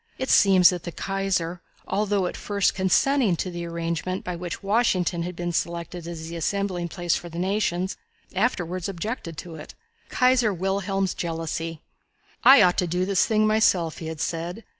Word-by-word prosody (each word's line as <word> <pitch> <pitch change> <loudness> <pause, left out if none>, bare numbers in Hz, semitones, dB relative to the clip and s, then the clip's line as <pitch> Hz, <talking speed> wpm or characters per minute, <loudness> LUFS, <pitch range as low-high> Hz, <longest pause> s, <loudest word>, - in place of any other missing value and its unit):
It 260 - -2
seems 190 -3 +6
that 180 -1 -4
the 175 - -6
Kaiser, 185 -3 -2 0.3
although 200 -1 0
at - - -3
first 200 -2 0
consenting 210 +3 +2
to 180 +2 -3
the 170 0 -5
arrangement 170 +2 -3
by 180 - -4
which 175 +2 -6
Washington 195 -5 +1
had 175 +1 -4
been 175 0 -3
selected 170 0 -3
as 165 -2 -6
the 170 - -7
assembling 185 0 -1
place 175 -1 -1
for 175 - -5
the 165 - -9
nations, 190 -1 -1 0.4
afterwards 185 -4 -1
objected 190 -3 -5
to 170 0 -8
it. 150 - -11 0.3
Kaiser 250 -3 +3
Wilhelm's 195 +1 -1
Jealousy. 165 -1 -4 0.6
"I 265 -5 +9
ought 180 -1 +3
to 180 - +1
do 180 +2 0
this 195 0 +2
thing 215 -1 +3
myself," 195 -7 +2
he 160 - -6
had 160 -1 -6
said. 175 +6 -3
180 Hz, 170 wpm, -25 LUFS, 170-200 Hz, 0.6 s, I